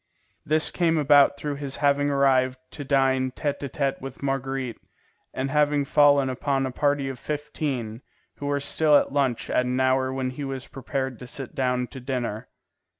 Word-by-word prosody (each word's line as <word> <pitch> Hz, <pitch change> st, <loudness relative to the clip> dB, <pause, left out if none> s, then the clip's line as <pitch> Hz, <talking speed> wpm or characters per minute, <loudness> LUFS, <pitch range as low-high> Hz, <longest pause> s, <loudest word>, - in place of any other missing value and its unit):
This 155 Hz, +1 st, +2 dB
came 165 Hz, -2 st, +1 dB
about 145 Hz, -1 st, +5 dB
through 145 Hz, -1 st, -4 dB
his 140 Hz, -1 st, -4 dB
having 145 Hz, 0 st, +2 dB
once 145 Hz, -, 0 dB
arrived 130 Hz, -2 st, +2 dB
to 145 Hz, -, -7 dB
dine 135 Hz, -1 st, +2 dB
tête 145 Hz, +1 st, -2 dB
à 140 Hz, -, -5 dB
tête 135 Hz, 0 st, -2 dB
with 135 Hz, +1 st, -8 dB
Marguerite, 135 Hz, -2 st, -2 dB, 0.5 s
and 135 Hz, +1 st, -3 dB
having 145 Hz, -1 st, +2 dB
fallen 145 Hz, -1 st, +4 dB
upon 135 Hz, +1 st, -1 dB
a 130 Hz, -, -3 dB
party 145 Hz, 0 st, 0 dB
of 135 Hz, -2 st, -6 dB
fifteen, 145 Hz, -6 st, -4 dB, 0.4 s
who 145 Hz, -, -5 dB
were 145 Hz, 0 st, 0 dB
still 150 Hz, +2 st, +3 dB
at -, -, 0 dB
lunch 135 Hz, -5 st, 0 dB
at 125 Hz, -, +1 dB
an 125 Hz, +1 st, -1 dB
hour 130 Hz, 0 st, +2 dB
when 130 Hz, -1 st, -2 dB
he 145 Hz, +3 st, -6 dB
was 135 Hz, -1 st, -5 dB
prepared 135 Hz, -2 st, -4 dB
to 125 Hz, -, -9 dB
sit 135 Hz, +1 st, -5 dB
down 125 Hz, -1 st, 0 dB
to 130 Hz, -, -10 dB
dinner. 125 Hz, -4 st, -4 dB
135 Hz, 185 wpm, -25 LUFS, 130-145 Hz, 0.5 s, about